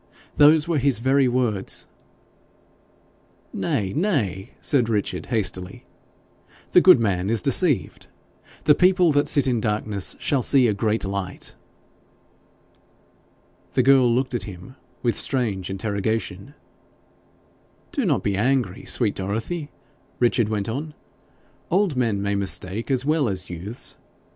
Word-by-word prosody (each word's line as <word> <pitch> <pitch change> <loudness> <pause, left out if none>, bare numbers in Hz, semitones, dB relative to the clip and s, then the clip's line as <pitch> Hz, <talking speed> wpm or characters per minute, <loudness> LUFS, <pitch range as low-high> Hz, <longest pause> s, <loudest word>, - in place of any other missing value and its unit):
Those 150 +1 +5
were 165 -4 +1
his 135 -2 +2
very 135 +3 +2
words.' 120 -6 -1 1.7
'Nay, 95 -2 -2
nay!' 120 - -1
said 125 -6 +1
Richard, 105 -3 -2
hastily; 95 -5 -3 0.9
'the 180 - +6
good 185 -8 +7
man 95 -4 0
is 115 0 +1
deceived; 140 - +1 0.6
the 150 - +6
people 180 0 +4
that 145 0 +2
sit 140 -2 +3
in 125 -4 0
darkness 105 -2 -1
shall 140 -3 0
see 130 0 +4
a 105 - +1
great 110 +1 -1
light.' 95 -1 -5 2.2
The 130 - +2
girl 130 -2 +5
looked 130 +2 0
at 120 - -1
him 95 +7 -11 0.3
with 120 -2 +1
strange 105 -9 -1
interrogation. 100 +3 -3 1.4
'Do 280 - -1
not 160 -10 +1
be 100 -1 0
angry, 120 -2 0
sweet 110 -5 0
Dorothy,' 115 - -4 0.5
Richard 120 -2 +2
went 105 -2 -2
on. 150 +7 -5 0.7
'Old 185 -4 +1
men 115 -6 0
may 100 0 -1
mistake 100 +3 -1
as 130 -1 +2
well 150 -4 +1
as 95 -2 -4
youths. 95 +7 -6
115 Hz, 125 wpm, -23 LUFS, 100-140 Hz, 2.2 s, good